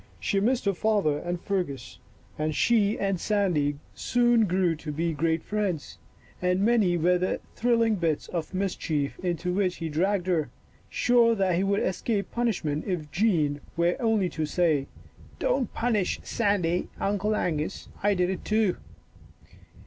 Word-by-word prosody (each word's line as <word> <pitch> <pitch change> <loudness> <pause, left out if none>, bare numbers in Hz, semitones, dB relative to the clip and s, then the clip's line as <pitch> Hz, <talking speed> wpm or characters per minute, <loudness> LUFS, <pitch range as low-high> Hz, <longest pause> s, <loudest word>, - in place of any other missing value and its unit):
She 200 - 0
missed 240 +4 +1
her 200 - +2
father 195 -7 +1
and 175 0 -3
Fergus, 155 - -3 0.4
but 155 0 -2
she 215 -3 +3
and 195 -2 -1
Sandy 175 -10 +1 0.2
soon 240 -2 +3
grew 180 -2 +1
to 155 -1 -6
be 165 +3 -1
great 160 +2 0
friends, 200 -7 -3 0.4
and 180 +1 +1
many 215 -7 +3
were 175 +2 +3
the 185 - -1 0.2
thrill 235 0 +2
ing 225 -2 +2
bits 165 -4 -1
of 165 -3 -4
mischief 170 -7 -2
into 180 0 -2
which 185 -2 +1
he 165 -2 -4
dragged 180 +4 0
her, 165 -7 0 0.4
sure 235 -2 +3
that 190 -4 +1
he 185 - +1
would 200 +1 +1
escape 200 +2 -1
punishment 180 -11 -1
if 160 -6 -3
Jean 160 -6 +1 0.2
were 170 +1 +2
only 225 -5 +2
to 155 - -3
say, 150 -4 +1 0.3
" - - -22
Don't 275 - 0
punish 225 -5 0
Sandy, 190 -6 0
Uncle 205 +2 0
Angus, 160 -2 -2
I 205 0 +2
did 180 0 +1
it 190 - -5
too." 215 -3 +1
185 Hz, 155 wpm, -27 LUFS, 165-210 Hz, 0.4 s, she